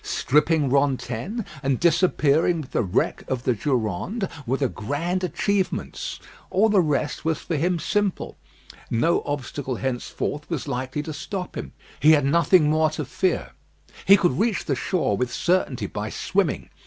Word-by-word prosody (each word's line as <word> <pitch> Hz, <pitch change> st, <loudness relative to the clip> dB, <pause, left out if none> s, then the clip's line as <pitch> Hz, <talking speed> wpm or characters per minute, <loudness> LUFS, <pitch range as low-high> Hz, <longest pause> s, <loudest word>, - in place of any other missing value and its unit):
Stripping 150 Hz, 0 st, +2 dB
Rantaine, 140 Hz, -, 0 dB, 0.2 s
and 135 Hz, -3 st, 0 dB
disappearing 170 Hz, -1 st, +3 dB
with 135 Hz, -, -11 dB
the -, -, +1 dB
wreck 95 Hz, -6 st, 0 dB
of 125 Hz, -2 st, -2 dB
the 125 Hz, -, +2 dB
Durande, 125 Hz, -, -1 dB, 0.2 s
were 130 Hz, +3 st, +1 dB
the 135 Hz, -, +1 dB
grand 155 Hz, -, -2 dB
achievements. 195 Hz, +1 st, -2 dB, 0.3 s
All 215 Hz, +4 st, +3 dB
the 205 Hz, -3 st, +5 dB
rest 150 Hz, -2 st, -1 dB
was 160 Hz, -1 st, 0 dB
for 170 Hz, -, -4 dB
him 175 Hz, +4 st, +1 dB
simple. 205 Hz, +3 st, -1 dB, 0.5 s
No 160 Hz, +9 st, +2 dB
obstacle 140 Hz, -2 st, -3 dB
henceforth 135 Hz, +4 st, -3 dB
was 165 Hz, -6 st, -3 dB
likely 130 Hz, +4 st, -3 dB
to 155 Hz, -, -5 dB
stop 180 Hz, +5 st, -5 dB
him. -, -, -6 dB, 0.3 s
He 155 Hz, +2 st, +6 dB
had 145 Hz, -3 st, +3 dB
nothing 170 Hz, +2 st, +4 dB
more 155 Hz, +1 st, +3 dB
to 155 Hz, -1 st, -4 dB
fear. 180 Hz, +7 st, -1 dB, 0.5 s
He 200 Hz, +1 st, +8 dB
could 175 Hz, -8 st, +1 dB
reach 220 Hz, -4 st, +1 dB
the 140 Hz, -, 0 dB
shore 170 Hz, -, 0 dB
with 125 Hz, +4 st, -1 dB
certainty 145 Hz, -, 0 dB
by -, -, -4 dB
swimming. -, -, -1 dB
150 Hz, 155 wpm, -24 LUFS, 130-180 Hz, 0.5 s, He